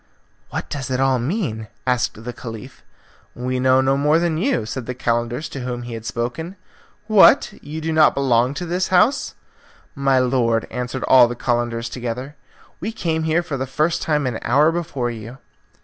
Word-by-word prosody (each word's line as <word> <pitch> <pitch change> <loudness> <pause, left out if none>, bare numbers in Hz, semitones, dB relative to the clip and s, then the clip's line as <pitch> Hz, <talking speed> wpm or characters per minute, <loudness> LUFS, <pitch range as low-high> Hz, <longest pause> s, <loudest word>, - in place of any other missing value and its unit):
"What - - -4
does 135 -2 -5
it 130 0 -1
all 135 -1 +2
mean?' 120 - -2 0.2
asked 125 -3 -1
the 125 +1 -5
Caliph. 115 -3 -9 0.5
"We 125 +1 -2
know 130 +1 +4
no 135 +1 +2
more 150 +3 +3
than 165 -2 0
you," 235 - 0
said 115 +2 -5
the 125 - -4
Calender 120 +2 -1
to 140 - -6
whom 125 -1 -4
he 120 0 -7
had 115 0 -6
spoken. 155 +10 -4 0.5
"What! 215 -3 +6
You 155 +2 -6
do 160 0 -2
not 155 -1 +5
belong 130 -1 +2
to 175 - -4
the 175 +2 -2
house?" 210 +10 +2 0.6
"My 135 -2 +2
lord," 120 -3 +2
answered 125 +1 -4
all 125 -2 +7
the 120 - -5
Calenders 120 -1 -1
together, 125 +4 -5 0.4
"we 210 +6 -3
came 160 -7 -2
here 160 +2 +2
for 150 -5 -4
the 130 0 -3
first 155 +5 0
time 150 -3 0
an 125 -3 -2
hour 145 +6 +3
before 145 -8 -2
you." 115 +2 -9
130 Hz, 180 wpm, -21 LUFS, 120-155 Hz, 0.6 s, all